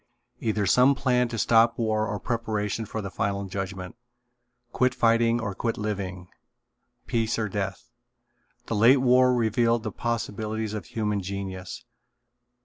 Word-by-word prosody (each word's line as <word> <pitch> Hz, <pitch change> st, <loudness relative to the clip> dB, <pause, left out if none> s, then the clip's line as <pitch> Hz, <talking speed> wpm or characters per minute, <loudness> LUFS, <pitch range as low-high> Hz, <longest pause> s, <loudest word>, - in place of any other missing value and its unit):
Either 110 Hz, -2 st, 0 dB
some 125 Hz, +8 st, +5 dB
plan 125 Hz, -2 st, +2 dB
to 115 Hz, -1 st, -5 dB
stop 115 Hz, +1 st, +4 dB
war 110 Hz, -2 st, 0 dB
or 105 Hz, 0 st, -3 dB
preparation 110 Hz, -2 st, -2 dB
for 110 Hz, +1 st, -5 dB
the 100 Hz, -, -5 dB
final 100 Hz, 0 st, -2 dB
judgment. 95 Hz, -1 st, -5 dB, 0.8 s
Quit 125 Hz, 0 st, +1 dB
fighting 115 Hz, -1 st, +3 dB
or 105 Hz, -3 st, -3 dB
quit 115 Hz, +3 st, -2 dB
living. 95 Hz, -4 st, -4 dB, 0.8 s
Peace 115 Hz, -1 st, 0 dB
or 110 Hz, -2 st, -1 dB
death. 100 Hz, +3 st, -4 dB, 0.8 s
The 115 Hz, -, -3 dB
late 115 Hz, +6 st, +6 dB
war 125 Hz, 0 st, +5 dB
revealed 115 Hz, 0 st, +1 dB
the -, -, -3 dB
possibilities 110 Hz, -2 st, -3 dB
of 105 Hz, -5 st, -5 dB
human 105 Hz, +2 st, -2 dB
genius. 95 Hz, -1 st, -6 dB
110 Hz, 140 wpm, -26 LUFS, 100-115 Hz, 0.8 s, late